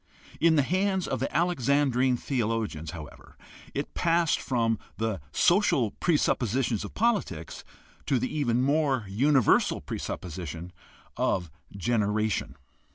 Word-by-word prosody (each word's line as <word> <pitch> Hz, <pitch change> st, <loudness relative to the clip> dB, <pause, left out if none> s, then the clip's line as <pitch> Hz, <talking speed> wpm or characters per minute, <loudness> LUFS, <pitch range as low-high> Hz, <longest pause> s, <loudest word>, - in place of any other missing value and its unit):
In 165 Hz, -1 st, +4 dB
the 145 Hz, -, +4 dB
hands 190 Hz, +3 st, 0 dB
of -, -, -2 dB
the -, -, -2 dB
Alexandrine 135 Hz, -6 st, +2 dB
theologians, 115 Hz, -, -2 dB
however, 80 Hz, -3 st, -10 dB, 0.4 s
it -, -, -3 dB
passed 170 Hz, -1 st, +2 dB
from 115 Hz, -4 st, 0 dB, 0.2 s
the 110 Hz, -6 st, -2 dB
social 175 Hz, -, +3 dB
presuppositions 125 Hz, -, +1 dB
of 105 Hz, -, -8 dB
politics 200 Hz, -, -1 dB, 0.4 s
to 135 Hz, -, +2 dB
the 130 Hz, +5 st, -2 dB
even 125 Hz, -4 st, +1 dB
more 140 Hz, -4 st, +1 dB
universal 130 Hz, +5 st, +3 dB
presupposition 85 Hz, 0 st, -6 dB, 0.5 s
of 90 Hz, -4 st, 0 dB, 0.3 s
generation. 105 Hz, -, 0 dB
125 Hz, 110 wpm, -27 LUFS, 105-150 Hz, 0.5 s, In